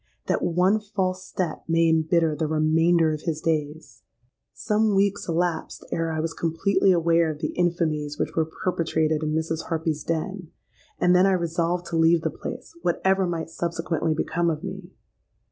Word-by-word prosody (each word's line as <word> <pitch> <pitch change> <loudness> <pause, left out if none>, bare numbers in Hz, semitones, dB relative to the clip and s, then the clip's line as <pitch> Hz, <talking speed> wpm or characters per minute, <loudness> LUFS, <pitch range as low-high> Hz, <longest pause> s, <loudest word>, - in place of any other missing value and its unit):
That - - 0
one 180 +5 +2
false 190 -3 -2
step 180 -4 -4
may 165 0 +3
embitter 160 0 +2
the 155 +1 -1
remainder 160 +1 +3
of 155 - -5
his 160 -2 -2
days! 150 -7 -3 0.5
"Some 215 -1 +1
weeks 200 +1 +1
elapsed 170 0 -2
ere 165 -1 -1
I 160 - -2
was 160 +1 -2
completely 170 +5 +1
aware 170 -1 +3
of 155 - -4
the 155 0 -3
infamies 155 -4 0
which - - -2
were 160 -1 +1
perpetrated 160 -3 0
in 155 0 -1
Mrs. 160 0 -2
Harpy's 160 -2 -2
den; 180 +3 -3 0.5
and 180 0 +4
then 185 +2 +5
I 195 - +3
resolved 170 0 -1
to 165 - 0
leave 165 +1 +4
the 160 - 0
place, - - -8
whatever 190 +2 +1
might 165 -1 -4
subsequently 165 -2 -1
become 170 +2 0
of 155 0 -3
me. 190 -2 -7
165 Hz, 165 wpm, -25 LUFS, 160-180 Hz, 0.5 s, then